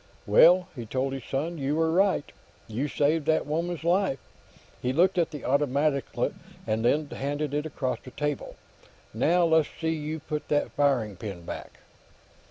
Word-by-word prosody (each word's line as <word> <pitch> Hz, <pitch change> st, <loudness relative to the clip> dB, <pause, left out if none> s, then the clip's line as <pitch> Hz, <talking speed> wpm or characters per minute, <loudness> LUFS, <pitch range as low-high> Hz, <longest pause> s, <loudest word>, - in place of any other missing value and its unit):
"Well," 175 Hz, -, +6 dB
he 120 Hz, -4 st, -6 dB
told 130 Hz, +4 st, -1 dB
his 135 Hz, -3 st, -6 dB
son, 160 Hz, +5 st, -3 dB
"you 140 Hz, +2 st, 0 dB
were 160 Hz, 0 st, +2 dB
right. 190 Hz, -3 st, +2 dB, 0.4 s
You 120 Hz, +6 st, -2 dB
saved 150 Hz, +2 st, +1 dB
that 160 Hz, -, +2 dB
woman's 165 Hz, +3 st, -2 dB
life." 175 Hz, -3 st, +2 dB, 0.6 s
He 125 Hz, +1 st, 0 dB
looked 180 Hz, +5 st, +3 dB
at 170 Hz, -, +2 dB
the 150 Hz, -, -8 dB
automatic, 140 Hz, +1 st, +1 dB, 0.6 s
and 110 Hz, 0 st, -1 dB
then 150 Hz, +6 st, +2 dB
handed 145 Hz, +1 st, -3 dB
it 150 Hz, +1 st, -1 dB
across 130 Hz, -5 st, -2 dB
the -, -, -9 dB
table. 145 Hz, +1 st, -3 dB, 0.6 s
"Now, 170 Hz, +10 st, +3 dB
let's 160 Hz, -2 st, +3 dB
see 160 Hz, -, 0 dB
you 155 Hz, 0 st, -4 dB
put 150 Hz, 0 st, -5 dB
that 145 Hz, -, +1 dB
firing 125 Hz, -9 st, +1 dB
pin 95 Hz, -4 st, -7 dB
back." -, -, -8 dB
145 Hz, 165 wpm, -27 LUFS, 130-160 Hz, 0.6 s, Well